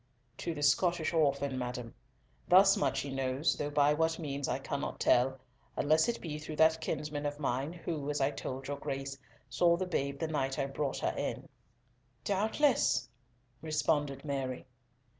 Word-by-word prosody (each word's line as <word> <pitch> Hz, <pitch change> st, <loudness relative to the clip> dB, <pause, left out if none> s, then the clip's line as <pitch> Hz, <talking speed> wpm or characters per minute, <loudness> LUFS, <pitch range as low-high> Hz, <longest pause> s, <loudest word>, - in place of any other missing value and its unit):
"To 170 Hz, -2 st, -3 dB
the 145 Hz, -, -4 dB
Scottish 170 Hz, +3 st, +2 dB
orphan, 140 Hz, -4 st, +1 dB
madam. 125 Hz, -2 st, -5 dB, 0.5 s
Thus 195 Hz, +2 st, +7 dB
much 135 Hz, -, 0 dB
he 140 Hz, -, -5 dB
knows, 135 Hz, +3 st, 0 dB
though 145 Hz, -, -3 dB
by 145 Hz, 0 st, +4 dB
what 160 Hz, +1 st, +1 dB
means 140 Hz, -4 st, -3 dB
I -, -, 0 dB
cannot -, -, -4 dB
tell, 130 Hz, +2 st, +3 dB, 0.4 s
unless 155 Hz, +8 st, +3 dB
it 235 Hz, -, -2 dB
be 155 Hz, -3 st, -5 dB
through 155 Hz, 0 st, -6 dB
that 160 Hz, +1 st, +4 dB
kinsman 150 Hz, -1 st, -3 dB
of 145 Hz, 0 st, -5 dB
mine, 135 Hz, +1 st, -1 dB
who, 165 Hz, -4 st, -4 dB
as 150 Hz, -, -1 dB
I 135 Hz, +1 st, +2 dB
told 135 Hz, -1 st, -5 dB
your 145 Hz, 0 st, -3 dB
Grace, 135 Hz, 0 st, -4 dB, 0.3 s
saw 170 Hz, +5 st, +3 dB
the 185 Hz, -, -1 dB
babe 140 Hz, -6 st, -2 dB
the 160 Hz, -, -2 dB
night 135 Hz, -4 st, -1 dB
I 140 Hz, -, 0 dB
brought 140 Hz, 0 st, -2 dB
her -, -, 0 dB
in." -, -, -3 dB, 0.8 s
"Doubtless," 205 Hz, -, +2 dB, 0.5 s
responded 145 Hz, -3 st, 0 dB
Mary. 135 Hz, -3 st, -3 dB
145 Hz, 165 wpm, -32 LUFS, 135-160 Hz, 0.8 s, Thus